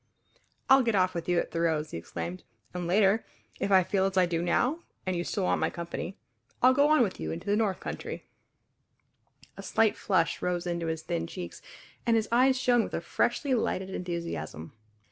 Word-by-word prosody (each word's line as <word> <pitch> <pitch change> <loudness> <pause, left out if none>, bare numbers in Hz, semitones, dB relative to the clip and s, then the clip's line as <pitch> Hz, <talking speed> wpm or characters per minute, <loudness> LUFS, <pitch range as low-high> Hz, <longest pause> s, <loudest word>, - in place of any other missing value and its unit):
"I'll 265 0 +7
get 230 -3 +1
off 185 -1 +3
with 170 0 -4
you 175 - +3
at - - -1
Thoreau's," 160 -2 0
he - - -4
exclaimed, 85 +1 -6 0.3
"and 180 -1 -3
later, 200 +4 +3 0.4
if - - -1
I 190 -1 +6
feel 190 +1 +1
as 190 0 -1
I 185 - +6
do 170 -1 -1
now, 250 - +1 0.3
and 185 -1 -1
you 175 - -1
still 195 +2 -2
want - - +1
my - - +2
company, 170 +2 -6 0.5
I'll 255 +1 +7
go 285 +2 +4
on 305 -5 +5
with 195 - -3
you 80 0 -3
into 80 - -6
the 205 - +2
north 210 -3 0
country!" - - -6 1.3
A - - -6
slight 225 -2 +2
flush 185 -5 0
rose 180 -1 -1
into 170 -1 -2
his 160 -1 -3
thin 85 0 -2
cheeks 85 0 -7 0.4
and 230 - +3
his 225 -1 +1
eyes 260 +2 +4
shone 245 -2 +3
with - - -5
a - - 0
freshly 280 -3 0
lighted 190 -5 -1
enthusiasm. 170 - -5
185 Hz, 200 wpm, -29 LUFS, 170-220 Hz, 1.3 s, I'll